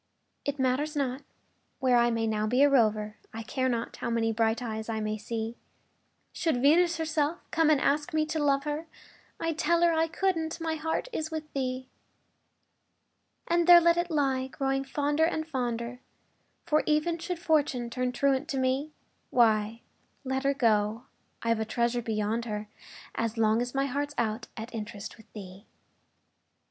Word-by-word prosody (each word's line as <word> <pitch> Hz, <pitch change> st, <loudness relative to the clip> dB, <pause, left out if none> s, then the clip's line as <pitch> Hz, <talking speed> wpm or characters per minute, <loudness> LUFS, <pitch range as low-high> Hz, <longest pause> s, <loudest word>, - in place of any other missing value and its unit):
It 285 Hz, 0 st, -2 dB
matters 270 Hz, +4 st, 0 dB
not 270 Hz, -1 st, -1 dB, 0.6 s
where 255 Hz, -2 st, +3 dB
I 240 Hz, 0 st, +4 dB
may 230 Hz, -1 st, 0 dB
now 215 Hz, -1 st, 0 dB
be 250 Hz, +5 st, +3 dB
a 285 Hz, -, +6 dB
rover, 215 Hz, -4 st, +2 dB, 0.2 s
I 225 Hz, -, -5 dB
care 260 Hz, +3 st, -1 dB
not 235 Hz, -2 st, -3 dB
how -, -, -3 dB
many 225 Hz, -1 st, +1 dB
bright 225 Hz, 0 st, +1 dB
eyes 220 Hz, -2 st, -5 dB
I 220 Hz, -1 st, -1 dB
may 215 Hz, 0 st, -2 dB
see; 225 Hz, +2 st, -4 dB, 0.8 s
Should 325 Hz, -7 st, 0 dB
Venus 335 Hz, +6 st, +4 dB
herself 315 Hz, 0 st, 0 dB
come 325 Hz, -1 st, +3 dB
and 300 Hz, -3 st, +4 dB
ask 295 Hz, +5 st, +1 dB
me 310 Hz, -1 st, +1 dB
to 315 Hz, -1 st, -2 dB
love 275 Hz, -1 st, +2 dB
her, 300 Hz, +2 st, -3 dB, 0.5 s
I'd 330 Hz, -1 st, -2 dB
tell 340 Hz, +2 st, +3 dB
her 340 Hz, -1 st, +5 dB
I 325 Hz, 0 st, +2 dB
couldn't 330 Hz, -2 st, -1 dB
my 325 Hz, -1 st, -1 dB
heart 320 Hz, +7 st, -2 dB
is 310 Hz, -6 st, -2 dB
with 315 Hz, -1 st, -6 dB
thee. 255 Hz, -1 st, -2 dB, 1.6 s
And 340 Hz, 0 st, +2 dB
there 350 Hz, -1 st, +10 dB
let 340 Hz, 0 st, +4 dB
it 345 Hz, +1 st, -1 dB
lie, 270 Hz, -4 st, +1 dB
growing 270 Hz, 0 st, -1 dB
fonder 290 Hz, +3 st, +1 dB
and, 315 Hz, -2 st, -2 dB
fonder 245 Hz, -4 st, -3 dB, 0.7 s
For, 305 Hz, 0 st, +3 dB
even 310 Hz, +3 st, +1 dB
should 350 Hz, +2 st, -3 dB
Fortune 290 Hz, -8 st, +1 dB
turn 250 Hz, +1 st, -1 dB
truant 275 Hz, +3 st, +1 dB
to 280 Hz, -, -3 dB
me, 265 Hz, +4 st, 0 dB, 0.4 s
Why, 225 Hz, -1 st, +2 dB, 0.4 s
let 265 Hz, 0 st, -2 dB
her 275 Hz, 0 st, +2 dB
go 220 Hz, -3 st, +2 dB, 0.4 s
I've 230 Hz, -1 st, +1 dB
a -, -, +1 dB
treasure 235 Hz, +2 st, 0 dB
beyond 220 Hz, +1 st, -1 dB
her, 210 Hz, -1 st, -4 dB, 0.4 s
As 230 Hz, 0 st, -2 dB
long 220 Hz, +1 st, +3 dB
as 245 Hz, +2 st, -4 dB
my 275 Hz, 0 st, +2 dB
heart's 285 Hz, +2 st, -3 dB
out 225 Hz, 0 st, -1 dB
at 225 Hz, +3 st, -7 dB
interest 215 Hz, -2 st, -6 dB
With 220 Hz, -, -19 dB
thee! 195 Hz, 0 st, -10 dB
265 Hz, 170 wpm, -28 LUFS, 230-310 Hz, 1.6 s, there